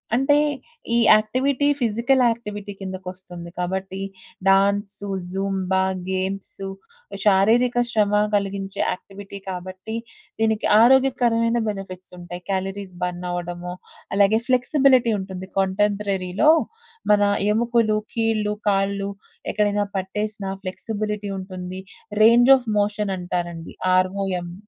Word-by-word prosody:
అంటే 270 Hz, +3 st, +3 dB, 0.6 s
ఈ -, -, +4 dB, 0.2 s
activity 260 Hz, +6 st, +1 dB
physical activity 230 Hz, -3 st, +1 dB
కిందకొస్తుంది. 185 Hz, -2 st, -8 dB
కాబట్టి 190 Hz, +1 st, -3 dB, 0.5 s
డాన్సు, 200 Hz, +1 st, +2 dB, 0.2 s
జూంబా, 190 Hz, -1 st, 0 dB, 0.3 s
గేమ్సు 190 Hz, +1 st, -3 dB, 0.6 s
శారీరక 235 Hz, +5 st, +4 dB
శ్రమ 210 Hz, -3 st, +1 dB, 0.2 s
గలిగించే 195 Hz, -1 st, -2 dB
యాక్టివిటీ 200 Hz, +2 st, -8 dB
కాబట్టి, 185 Hz, +4 st, -6 dB, 0.4 s
దీనికి 220 Hz, -1 st, +1 dB
ఆరోగ్యకరమైన 240 Hz, -2 st, +4 dB
బెనిఫిట్సుంటాయి. 180 Hz, -3 st, -8 dB
క్యాలరీస్ 195 Hz, 0 st, -3 dB
బర్నవ్వడమో, 175 Hz, 0 st, -4 dB, 0.4 s
అలాగే 205 Hz, +2 st, +4 dB
ఫ్లెక్సిబిలిటీ 255 Hz, -1 st, +3 dB
ఉంటుంది. 190 Hz, -1 st, -7 dB
కాంటెంపరరీ‌లో 200 Hz, +4 st, +1 dB, 0.6 s
మన 205 Hz, 0 st, +5 dB, 0.3 s
ఎముకులు, 230 Hz, -1 st, +2 dB, 0.2 s
కీళ్ళు, 220 Hz, -2 st, +1 dB, 0.2 s
కాళ్ళు 200 Hz, 0 st, 0 dB, 0.4 s
ఎక్కడైనా 205 Hz, -1 st, +1 dB
పట్టేసినా 200 Hz, +1 st, -3 dB
ఫ్లెక్సిబులిటీ 210 Hz, +1 st, -4 dB
ఉంటుంది. 185 Hz, 0 st, -7 dB, 0.4 s
Range 240 Hz, +3 st, +7 dB
of 250 Hz, -3 st, -11 dB
మోషనంటారండి. 180 Hz, -5 st, -2 dB, 0.2 s
Are 185 Hz, 0 st, +3 dB
oh -, -, -1 dB, 0.2 s
M. 175 Hz, 0 st, -8 dB
200 Hz, 90 wpm, -23 LUFS, 190-220 Hz, 0.6 s, Range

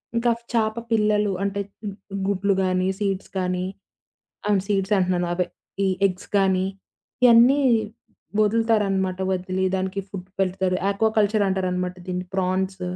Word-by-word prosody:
ఇంకా 235 Hz, +1 st, +3 dB, 0.2 s
చాప 220 Hz, -1 st, +1 dB, 0.2 s
పిల్లలు 210 Hz, -2 st, +2 dB
అంటే, 200 Hz, 0 st, -1 dB, 0.7 s
గుడ్లు 200 Hz, 0 st, +1 dB
గానీ, 185 Hz, 0 st, +1 dB
సీడ్స్ 195 Hz, -2 st, -2 dB
కానీ, 180 Hz, 0 st, -1 dB, 0.8 s
అ -, -, 0 dB, 0.2 s
సీడ్స్ 200 Hz, 0 st, +1 dB
అంటున్నాను 180 Hz, -1 st, +1 dB
అవే, 180 Hz, 0 st, 0 dB, 0.4 s
ఈ -, -, +3 dB, 0.2 s
ఎగ్స్ 185 Hz, -1 st, -8 dB
గాని, 190 Hz, -1 st, +2 dB, 0.6 s
ఇయన్నీ 245 Hz, +4 st, +7 dB, 0.8 s
వదులుతారనమాట. 205 Hz, -4 st, +1 dB
వదిలి 185 Hz, +1 st, -1 dB
దానికి 190 Hz, +1 st, -2 dB
ఫుడ్ 185 Hz, -1 st, -8 dB
పెడతారు. 185 Hz, -1 st, +1 dB
యాక్వా 200 Hz, +2 st, +2 dB
కల్చర్ 210 Hz, 0 st, +3 dB
అంటారనమాట 180 Hz, -1 st, -1 dB
దీన్ని. 180 Hz, 0 st, -3 dB
ఫ్రాన్స్ 190 Hz, 0 st, -1 dB
190 Hz, 120 wpm, -23 LUFS, 185-210 Hz, 0.8 s, ఇయన్నీ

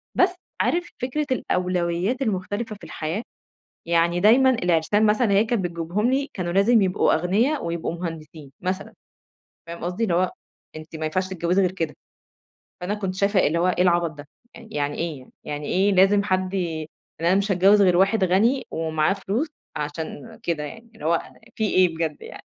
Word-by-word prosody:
بس 365 Hz, 0 st, +3 dB, 0.3 s
عارف 345 Hz, 0 st, 0 dB
فكرة 265 Hz, +5 st, -1 dB
الأولويات 180 Hz, +1 st, 0 dB
المختلفة 215 Hz, 0 st, -2 dB
في 205 Hz, -, -19 dB
الحياة؟ 165 Hz, +8 st, -4 dB, 0.6 s
يعني 170 Hz, +1 st, +2 dB
دايمًا 245 Hz, +7 st, +6 dB
العرسان 180 Hz, -1 st, +2 dB
مثلًا 215 Hz, +1 st, +2 dB
هي 200 Hz, +2 st, +4 dB
كانت 220 Hz, -4 st, -1 dB
بتجيبهم 175 Hz, +7 st, -1 dB
لي 275 Hz, +2 st, 0 dB
كانوا 175 Hz, -3 st, -3 dB
لازم 205 Hz, +4 st, +4 dB
يبقوا 185 Hz, -1 st, +2 dB
أغنِيَا 205 Hz, -, +1 dB
ويبقوا 170 Hz, -3 st, -3 dB
مهندسين، 160 Hz, -4 st, -7 dB
مثلًا، 185 Hz, +2 st, -3 dB, 0.7 s
فاهم 170 Hz, 0 st, -7 dB
قصدي؟ 180 Hz, +6 st, -3 dB
اللي 185 Hz, -6 st, 0 dB
هو 180 Hz, +1 st, +2 dB, 0.5 s
أنتِ 155 Hz, +1 st, -9 dB
ما 160 Hz, -, -4 dB
ينفعش 185 Hz, +4 st, -1 dB
تتجوزي 180 Hz, +1 st, 0 dB
غير 180 Hz, -1 st, +1 dB
كده. 165 Hz, -5 st, -3 dB, 0.9 s
فأنا 180 Hz, +4 st, -2 dB
كنت 195 Hz, -3 st, -3 dB
شايفة 200 Hz, 0 st, +2 dB
اللي 165 Hz, +3 st, +1 dB
هو 175 Hz, +2 st, +2 dB
ايه 180 Hz, -, +2 dB
العبط 175 Hz, -2 st, +2 dB
ده؟! 145 Hz, -1 st, -12 dB, 0.3 s
يعني 150 Hz, -11 st, -4 dB
ايه 165 Hz, -4 st, -3 dB
يعني؟ 130 Hz, -, -17 dB
يعني 145 Hz, 0 st, -5 dB
إيه 195 Hz, +5 st, +2 dB
لازم 195 Hz, +2 st, +5 dB
حد 185 Hz, -1 st, -1 dB
ي -, -, +1 dB, 0.6 s
يعني 170 Hz, +2 st, +2 dB
أنا -, -, +5 dB
مش 200 Hz, +1 st, +1 dB
هاتجوز 195 Hz, +3 st, +5 dB
غير 180 Hz, -2 st, +4 dB
واحد 195 Hz, +2 st, +3 dB
غني 220 Hz, +9 st, +2 dB
ومعاه 160 Hz, 0 st, 0 dB
فلوس 205 Hz, +9 st, -2 dB, 0.3 s
عشان 160 Hz, +9 st, -6 dB
كده 170 Hz, -8 st, -2 dB
يعني، 225 Hz, +10 st, -9 dB
اللي 220 Hz, -, -11 dB
هو 165 Hz, +1 st, +2 dB, 0.3 s
في 220 Hz, -, -1 dB
ايه 180 Hz, -3 st, +3 dB
بجد 160 Hz, -2 st, -2 dB
يعني؟! -, -, -10 dB
185 Hz, 175 wpm, -23 LUFS, 170-210 Hz, 0.9 s, دايمًا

